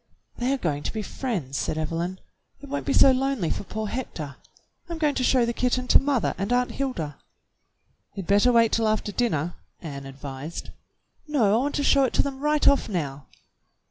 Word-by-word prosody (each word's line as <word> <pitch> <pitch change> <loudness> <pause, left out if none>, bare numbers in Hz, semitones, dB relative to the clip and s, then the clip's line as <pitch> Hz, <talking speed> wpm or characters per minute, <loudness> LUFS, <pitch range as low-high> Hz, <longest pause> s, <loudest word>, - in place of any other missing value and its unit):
"They 245 +2 0
are 275 - +1
going 150 - -1
to - - -3
be 215 -1 -3
friends," 185 - -3
said - - -2
Evelyn. 170 +4 -2 0.4
"It 285 - -11
won't 285 +1 -3
be - - +2
so 270 - +7
lonely 260 - 0
for - - -3
poor 220 +2 -4
Hector. 170 - -5 0.5
I'm 335 - -4
going 300 -2 +2
to 255 - -1
show 250 -1 +4
the 235 - -1
kitten 250 +1 0
to - - +8
mother 275 -5 +1
and 200 +4 -2
Aunt 250 0 +2
Hilda." 175 - -3 1.0
"You'd 195 -3 -5
better 205 +6 +4
wait 230 -2 +4
till 225 -1 +2
after 215 -1 0
dinner," 175 -8 0 0.3
Ann 140 -4 -7
advised. 135 +3 -7 0.6
"No, 295 -5 +1 0.2
I 285 - 0
w^ant - - -10
to 290 - 0
show 275 0 +5
it 255 - -2
to - - +3
them 275 -1 -4
right 300 +1 +2
off 280 - +4
now." 145 -8 -3
225 Hz, 200 wpm, -25 LUFS, 165-265 Hz, 1.0 s, to